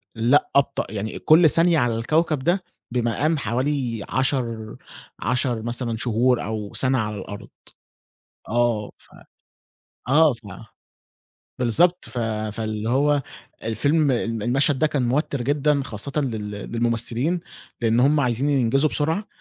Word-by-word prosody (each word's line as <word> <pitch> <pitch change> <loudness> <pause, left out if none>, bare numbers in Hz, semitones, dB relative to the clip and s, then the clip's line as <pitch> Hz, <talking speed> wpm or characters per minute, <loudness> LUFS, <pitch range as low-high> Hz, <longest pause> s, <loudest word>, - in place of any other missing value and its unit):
لأ، 120 +6 +3
أبطأ. 140 0 +2
يعني 110 0 -4
إ - - -6
كل 160 +1 +6
ثانية 165 +1 +3
على 120 -3 +1
الكوكب 155 +6 +1
ده 175 +7 0 0.3
بمقام 125 +6 0
حوالي 125 -2 -2
10- 120 -5 -1 0.4
10 125 -2 -1
مثلًا 120 0 -2
شهور، 120 +2 +1
أو 105 -1 -5
سَنَة 130 0 +3
على 105 -2 -2
الأرض. 100 +1 -8 1.0
آه، 115 -3 0
ف - - -14 1.0
آه، 150 +2 +5
ف 115 - -7 1.2
بالضبط، 170 +9 +3
ف 120 - -7 0.4
فاللِّي 110 0 -3
هو 145 +3 +2 0.4
الفيلم 145 +6 +1
الم 115 -2 -2
المشهد 135 +4 +1
ده 155 - +3
كان 135 -5 -1
موتِّر 140 +1 -1
جدًا، 145 +2 +1
خاصةّ 135 +5 -3
لل 110 -6 -4
للممثلين، 115 - -1 0.4
لأن 115 0 +2
همّ 145 +4 +4
عايزين 130 +1 0
ينجزوا 135 +2 +2
بسرعة، 160 +9 -1
125 Hz, 130 wpm, -23 LUFS, 115-145 Hz, 1.2 s, كل